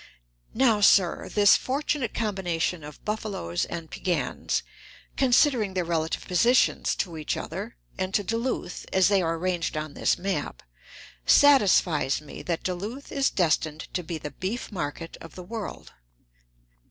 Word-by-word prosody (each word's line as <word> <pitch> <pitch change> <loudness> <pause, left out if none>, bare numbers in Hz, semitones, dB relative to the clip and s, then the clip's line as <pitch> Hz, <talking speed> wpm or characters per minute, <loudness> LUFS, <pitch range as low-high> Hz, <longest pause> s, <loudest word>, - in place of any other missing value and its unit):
Now, 230 -4 +3
sir, 190 -3 +4
this 205 -1 +6
fortunate 275 -2 -1
combination 180 -6 -1
of 150 0 -11
buffaloes 205 - -2
and 165 -2 -7
Piegans, 180 -2 -1 0.5
considering 245 -6 +3
their 180 -2 0
relative 165 -1 -1
positions 235 +8 +3
to 170 -4 -3
each 155 - -2
other - - -6 0.2
and 185 0 -1
to 205 - +2
Duluth, 230 -4 -3
as 190 0 +4
they 200 -2 +3
are 165 -1 0
arranged 170 -2 -1
on 155 -1 -4
this - - +1
map, 180 - -3 0.6
satisfies 195 - +5
me 150 -2 -10
that 170 -2 -3
Duluth 205 +10 -5
is 275 -1 +2
destined 155 -3 0
to 180 - -1
be 170 -1 -5
the 150 -1 -7
beef 195 - -4
market 165 -2 -5
of 165 - -11
the 180 - -8
world. 220 +3 -7
185 Hz, 140 wpm, -26 LUFS, 165-220 Hz, 0.6 s, this